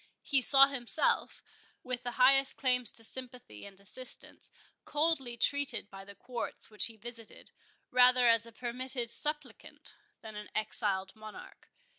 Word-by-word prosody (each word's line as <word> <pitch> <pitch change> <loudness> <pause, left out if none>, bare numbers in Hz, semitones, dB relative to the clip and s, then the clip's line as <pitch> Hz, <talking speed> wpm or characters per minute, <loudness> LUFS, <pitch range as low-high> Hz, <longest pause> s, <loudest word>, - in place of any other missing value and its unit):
He 275 -2 +3
saw 275 +1 +6
himself, 275 +2 -2 0.4
with 250 -1 -4
the 245 -1 -5
highest 270 +1 +4
claims 250 -4 0
to 225 - -6
sympathy 245 - -8
and 195 -1 -16
assistance, 245 +6 -9 0.3
coldly 295 -6 -1
treated 285 -4 0
by 195 0 -11
the 200 0 -13
Courts 240 -1 -7
which 210 - +5
he 225 -1 -9
visited, 230 0 -11 0.4
rather 250 0 +5
as 230 -1 +3
a - - -12
permitted 245 +1 -4
supplicant, 295 -5 +1 0.3
than 220 -1 -10
an 210 0 -9
exiled 200 -3 0
Monarch. 215 -1 -13
245 Hz, 140 wpm, -31 LUFS, 220-260 Hz, 0.4 s, saw